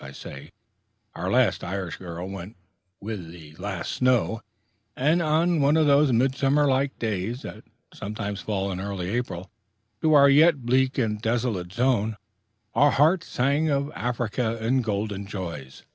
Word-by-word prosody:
I 70 0 -9
say, 70 +3 -10 0.6
our 90 +2 -4
last 120 -2 +2
Irish 95 -2 -4
girl 85 0 -7
went 95 +1 -8 0.4
with 100 -5 -6
the 80 -3 -13
last 95 -1 -4
snow, 125 -3 +1 0.5
and 155 +7 +2
on 165 +1 +2
one 145 +3 +4
of 160 - +4
those 145 -1 +4
midsummer 135 +4 +2
like 135 +1 +1
days 110 +3 -3
that - - -9 0.3
sometimes 105 -1 -5
fall 100 -2 -2
in 90 - -4
early 95 -2 -4
April 105 -6 -4 0.5
to 155 -1 +4
our 140 -1 +8
yet 145 -1 +5
bleak 130 +2 +2
and 105 -4 -1
desolate 110 -6 -1
zone, 115 -2 +1 0.6
our 145 +5 +5
hearts 160 +6 +3
sang 140 +5 +1
of 140 0 0
Africa 120 -1 -2
and 125 +3 +1
golden 100 -2 -3
joys. 85 -10 -7
115 Hz, 150 wpm, -25 LUFS, 95-140 Hz, 0.6 s, our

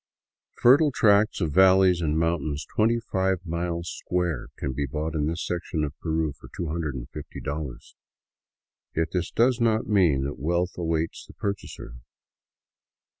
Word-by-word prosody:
Fertile 140 +5 +6
tracts 105 -3 +3
of 80 -3 0
valleys 95 0 +5
and 80 -1 0
mountains 80 -3 -1
twenty 115 +2 +3
five 95 -2 0
miles 85 0 -3 0.2
square 85 -8 -1
can 65 -2 -3
be 70 +2 -2
bought 75 +3 -3
in 75 -2 0
this 85 +2 -2
section 85 -2 -2
of 70 -2 -3
Peru 80 -2 -1
for - - -15
$250. 75 -2 -5 1.0
Yet 80 0 0
this 90 -2 -1
does 120 +1 +2
not 110 -1 +2
mean 90 -10 +3
that 70 -2 -4
wealth 85 +5 0
awaits 80 -1 -2
the - - -13
purchaser. 100 -11 -5
85 Hz, 135 wpm, -26 LUFS, 75-95 Hz, 1.0 s, Fertile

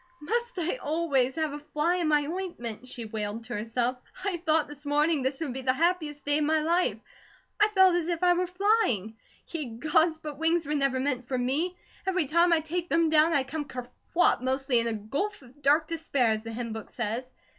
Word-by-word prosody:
"Must 475 +8 -2
I 350 +7 -1
always 285 - 0
have 315 -2 -1
'a 295 - -5
fly 300 +4 0
in 345 -3 0
my 295 -1 +3
ointment'?" 285 - -5
she 240 -2 -6
wailed 215 0 -4
to 240 +2 -7
herself. 235 +4 -1 0.3
"I 390 -3 0
thought 320 -2 +2
this 295 0 -12
morning 295 +1 +2
this 265 +1 -1
would 285 -6 -2
be 265 - -4
the 255 0 +2
happiest 315 -1 0
day 290 +1 +3
of - - +1
my 315 +1 +2
life. 340 +4 +1 0.6
I 420 - +7
felt 380 -3 +5
as 345 -2 0
if 345 0 -2
I 355 0 +6
were 360 +1 0
flying. 360 - +1 0.3
Ye 320 -4 -3
Gods, 315 +4 +3
but 300 -2 -8
wings 325 0 +2
were 295 - -2
never 275 -3 +1
meant 255 -2 -1
for 255 - -1
me. 295 +9 -1 0.3
Every 370 -4 +2
time 340 +5 +3
I 330 -1 +4
take 345 +3 -3
them, 330 -1 +2
down 315 +1 +5
I 280 -3 +3
come 295 +3 -4
kerflop, 250 +7 0
mostly 260 -1 +1
in 230 - 0
a 230 - -1
'gulf 275 - -3
of 260 +4 -18
dark 295 +3 +3
despair,' 285 -8 +1
as 215 0 -1
the 225 0 -7
hymn 230 0 -4
book 220 -1 -7
says. 240 +2 -3
295 Hz, 215 wpm, -28 LUFS, 255-335 Hz, 0.6 s, I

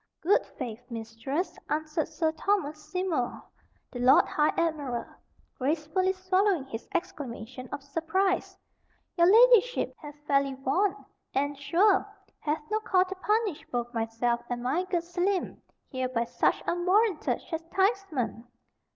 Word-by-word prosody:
"Good 380 +5 +3
faith, 230 0 -5
Mistress," 230 +8 -4
answered 310 +1 -1
Sir 320 0 0
Thomas 310 -3 -1
Seymour, 350 -9 -1 0.5
the 245 - -6
Lord 250 +2 +6
High 305 -6 +2
Admiral, 295 -8 -1 0.5
gracefully 310 +7 +1
swallowing 370 -4 +1
his 230 -4 -7
exclamation 260 - -5
of 275 - -5
surprise, 335 +6 0 0.6
"your 340 -1 +5
ladyship 485 +1 +5
hath 295 -2 -9
fairly 275 -2 +2
won, 365 +10 0 0.3
and, 285 +2 +1
sure, 375 +8 +3 0.4
hath 300 0 -2
no 430 - +2
call 370 -4 +3
to 380 - -5
punish 415 -2 0
both 240 -1 -2
myself 230 +1 0
and 245 0 -3
my 305 +9 0
good 355 -2 -1
Selim 355 +2 -1 0.3
here 260 -2 -2
by 235 -2 0
such - - +1
unwarranted 365 +1 +2
chastisement. 330 - -1
315 Hz, 125 wpm, -28 LUFS, 260-375 Hz, 0.6 s, Lord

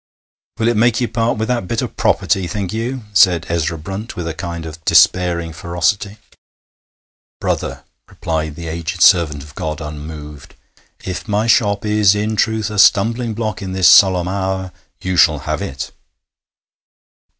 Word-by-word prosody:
'Will 115 - 0
it 120 -2 +1
make 120 +1 +3
you 120 - 0
part 115 0 -1
with 110 +1 -2
that 120 -7 -1
bit - - -1
o' - - -1
property, 95 -2 0
think 95 +1 -4
you?' 120 +3 -3
said 90 -4 +4
Ezra 85 0 -1
Brunt, 95 +8 -7
with 85 -2 -5
a 80 - -3
kind 85 -1 -6
of 80 0 -9
despairing 85 -2 +3
ferocity. 90 +6 -1 1.2
'Brother,' - - -3 0.3
replied 80 -4 -3
the 85 0 -7
aged 85 +2 -2
servant 80 -7 +4
of 75 0 -14
God, 75 +1 -4
unmoved, 75 -1 -9 0.5
'if 90 +4 -5
my 105 +1 0
shop 105 -3 +2
is 105 -2 +3
in 105 +1 -1
truth 110 -1 0
a 105 - -2
stumbling 115 +4 +3
block 110 -2 -3
in 95 -1 -5
this 95 -1 +3
solemn 90 -3 +6
hour, 95 -1 -3 0.3
you 95 -1 -2
shall 80 -3 +5
have - - -4
it.' 70 0 -5
95 Hz, 160 wpm, -18 LUFS, 80-105 Hz, 1.2 s, solemn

